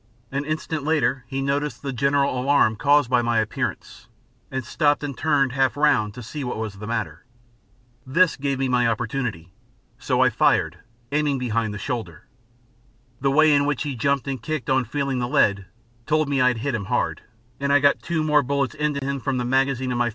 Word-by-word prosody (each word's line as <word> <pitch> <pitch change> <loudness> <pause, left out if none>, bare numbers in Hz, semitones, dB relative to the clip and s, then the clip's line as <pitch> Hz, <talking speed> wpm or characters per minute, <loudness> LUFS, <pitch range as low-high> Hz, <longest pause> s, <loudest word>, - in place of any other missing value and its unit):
An 140 +2 -2
instant 155 0 -3
later, 135 -4 0
he 135 +1 -3
noticed 145 +2 -2
the 135 -1 -3
general 140 0 +1
alarm 135 -4 +3
caused 145 +2 +3
by 125 0 +2
my 120 -1 0
appearance, 110 -1 -3 0.4
and 130 -2 -4
stopped 145 -2 +1
and 140 -2 -4
turned 145 -3 +1
half 135 +1 +1
round 125 -9 +2
to 125 - -8
see 145 +6 -6
what 125 - -4
was 110 -2 -4
the 105 - -7
matter. 115 -1 -3 0.8
This 165 +7 +3
gave 140 -1 -2
me 135 0 0
my 125 -2 +2
opportunity, 110 -7 -3 0.5
so - - 0
I - - +4
fired, - - +2 0.3
aiming 145 -1 +1
behind 115 -3 -1
the 105 - -5
shoulder. 100 -6 -5 0.9
The 135 - +1
way 155 +2 +5
in 145 0 +3
which 145 -1 -1
he 145 -3 -4
jumped 140 +3 0
and 135 -2 -3
kicked 155 -2 -3
on 130 -1 +2
feeling 135 +1 -2
the 120 - -1
lead 100 -9 +2 0.4
told 155 -1 +2
me 140 -2 +1
I 125 - +5
had 125 -2 +1
hit 140 - 0
him 105 -4 -3
hard, 120 +4 -1 0.4
and 140 0 0
I 145 - +6
got 140 0 +3
two 165 -2 -1
more 150 -1 +4
bullets 140 0 -1
into 150 -2 -2
him 140 0 -2
from 135 +1 -2
the 125 - -1
magazine 130 0 +1
of 120 - -1
my 120 0 +2
135 Hz, 205 wpm, -23 LUFS, 120-145 Hz, 0.9 s, I